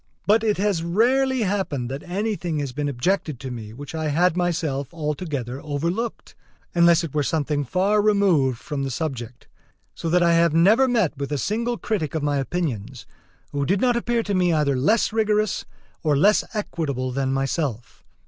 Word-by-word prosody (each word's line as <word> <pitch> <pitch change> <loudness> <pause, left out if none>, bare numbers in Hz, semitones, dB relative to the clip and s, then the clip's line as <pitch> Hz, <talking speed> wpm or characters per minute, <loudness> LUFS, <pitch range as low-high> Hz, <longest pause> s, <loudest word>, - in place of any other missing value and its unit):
But 215 +2 +4
it 215 -2 +1
has 200 -3 +1
rarely 250 +8 +2
happened 185 - -1
that 135 +2 -5
anything 185 -3 -2
has 140 -3 -2
been 145 +2 -2
objected 145 +1 -1
to 130 -2 -5
me 110 -3 -7
which 140 +7 -9
I 160 -1 -2
had 170 +4 +2
myself 160 -6 -1
altogether 150 -5 -4
overlooked, 170 +10 -3 0.4
unless 170 -1 +5
it 165 - -5
were 150 - +1
something 145 0 0
far 195 - +2
removed 190 - +3
from 140 +3 -5
the 135 - -2
subject: 125 -4 -5 0.5
so 165 - -4
that 175 +1 +3
I 170 0 +4
have 165 -1 +3
never 215 +11 +5
met 220 - +1
with 140 +1 -4
a 145 - 0
single 230 - -1
critic 165 - -2
of 155 - -1
my 145 -1 +1
opinions 130 - -3 0.5
who 145 -1 -1
did 185 +7 +1
not 245 +1 +2
appear 235 -1 0
to 205 - -2
me 180 -2 +2
either 150 -4 +2
less 210 - +2
rigorous 215 -1 +1 0.4
or 150 -4 +2
less 205 +8 +4
equitable 140 - -2
than 135 +1 -1
myself. 135 -3 -2
165 Hz, 175 wpm, -23 LUFS, 140-200 Hz, 0.5 s, unless